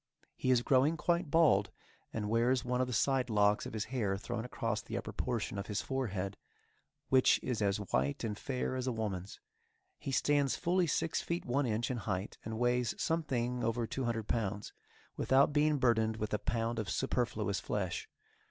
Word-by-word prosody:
He 130 - -2
is 125 -2 +4
growing 140 +6 +3
quite 170 +1 0
bald, 145 -11 +4 0.4
and 105 -2 -3
wears 120 +4 +2
one 125 0 0
of 130 - +1
the - - -4
side 130 +2 +2
locks 105 -1 +3
of - - -8
his 110 -1 -2
hair 100 -6 0
thrown 115 +2 -4
across 125 - -2
the - - -5
upper - - -5
portion 120 -3 -2
of 100 - -5
his 105 - -2
forehead, 100 -8 -2 0.7
which 130 -1 +5
is 125 -4 -2
as 100 -1 +2
white 70 - -1
and 110 -2 -2
fair 130 +3 -3
as 130 0 -2
a - - +2
woman's. 100 -5 -4 0.6
He 135 - -4
stands 140 0 +2
fully 175 0 +1
six 160 +2 0
feet 170 +1 -3
one 130 +2 +1
inch 115 +2 0
in 125 - -2
height, 100 -3 -3
and 110 0 -4
weighs 120 0 +1
something 125 -7 -1
over 115 +1 0
two 130 +3 -3
hundred 115 -2 -2
pounds, 105 -2 -2 0.4
without 135 +2 +4
being 150 0 +3
burdened 110 -4 +2
with 110 -1 -3
a 105 - +1
pound 115 0 -1
of 105 -3 -3
superfluous 110 -6 0
flesh. 95 -4 -3
120 Hz, 185 wpm, -33 LUFS, 105-130 Hz, 0.7 s, which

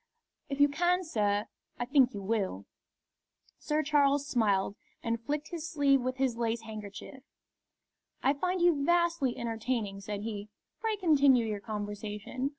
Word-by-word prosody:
"If 275 0 -4
you 285 - +7
can, 350 +5 +1
sir, 210 - 0 0.3
I 245 - -2
think 265 -1 +4
you 200 - -5
will." 190 - -1 0.9
Sir 305 0 0
Charles 285 -1 +3
smiled, 205 -7 +1 0.3
and 230 0 -1
flicked 295 +4 -3
his 335 -1 -5
sleeve 280 -4 +3
with 255 +1 -2
his 260 -3 0
lace 230 -1 -1
handkerchief. 215 +4 -9 1.0
"I 275 - +4
find 360 +5 -1
you 325 -5 +4
vastly 340 -5 +2
entertaining," 225 -3 -2
said 205 +1 -4
he. 210 -1 -5 0.3
"Pray 445 -1 0
continue 280 - +4
your 210 -2 -2
conversation. 210 +4 -4
255 Hz, 145 wpm, -30 LUFS, 215-290 Hz, 1.0 s, you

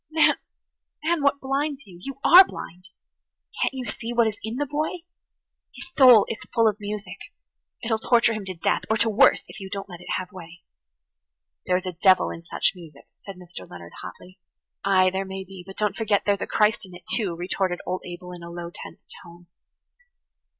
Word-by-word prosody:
Man, 310 -1 +4 0.7
man, 335 0 +1
what 280 0 +2
blinds 275 +1 -2
you? 180 -3 -14
You 275 +6 -7
are 365 +3 +10
blind. 185 - -10 0.7
Can't - - +2
you 255 -1 -4
see 230 +2 -5
what 235 -1 +4
is 220 -2 -1
in 220 +2 -4
the 290 +3 -1
boy? 305 +4 -3 0.7
His - - -9
soul 250 -6 +8
is 225 - -4 0.2
full 230 -1 +5
of 210 0 0
music. 205 0 -6 0.6
It'll 225 -1 0
torture 235 0 +3
him 215 -2 -4
to 185 -1 -5
death–or 215 +6 0
to 225 0 +2
worse–if 210 - +3
you 190 -1 -8
don't 195 0 -5
let 175 -1 -10
it - - -13
have 185 0 -6
way." 175 -2 -12 1.0
"There 180 - +3
is 185 +1 -1
a 185 - -3
devil 185 +2 +4
in 165 - -8
such 165 - 0
music," 165 -6 -14
said 195 - -11
Mr. 175 - -11
Leonard 85 -1 -11
hotly. 180 - -11 0.4
"Ay, 185 -1 +4
there 190 +1 -2
may 190 0 -6
be, 190 0 -11
but 195 - -11
don't 210 -3 0
forget 210 -2 +1
that - - -39
there's 200 -1 +1
a - - -2
Christ 210 0 +2
in 185 -2 -12
it, 175 - -14
too," 195 -7 0
retorted 180 +1 -2
old 185 - -3
Abel 180 0 -8
in 175 -1 -9
a 170 - -9
low 170 0 -7
tense - - -11 0.2
tone. 175 +1 -15
195 Hz, 200 wpm, -24 LUFS, 180-230 Hz, 1.0 s, are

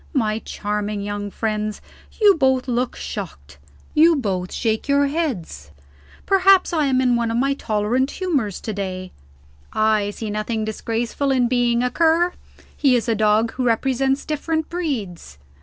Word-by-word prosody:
My 220 -6 0
charming 210 -1 -3
young 205 0 -4
friends, 215 0 -3 0.4
you 415 -2 +7
both 265 -5 +1
look 245 0 -1
shocked; 75 - -7 0.3
you 325 +2 +5
both 190 -9 -2
shake 220 +1 -1
your 280 0 +3
heads. 240 - -3 0.6
Perhaps 390 -1 +4
I 305 -3 +2
am 260 -1 +2
in 250 -2 +3
one 235 -1 0
of 230 - -1
my 275 +3 +2
tolerant 240 +1 0
humors 280 - -2
to 220 - -4
day; 185 -2 -5 0.6
I 215 -1 +2
see 210 +1 -5
nothing 215 +1 -2
disgraceful 230 +5 -2
in 255 -2 +3
being 240 -1 +1
a 250 - 0
Cur. 335 +2 +3 0.4
He 270 -3 +3
is 240 0 0
a 230 - +2
dog 215 +1 +2
who 255 - -3
represents 265 +3 +1
different 315 +1 -2
breeds. 225 - -4
235 Hz, 155 wpm, -21 LUFS, 210-280 Hz, 0.6 s, you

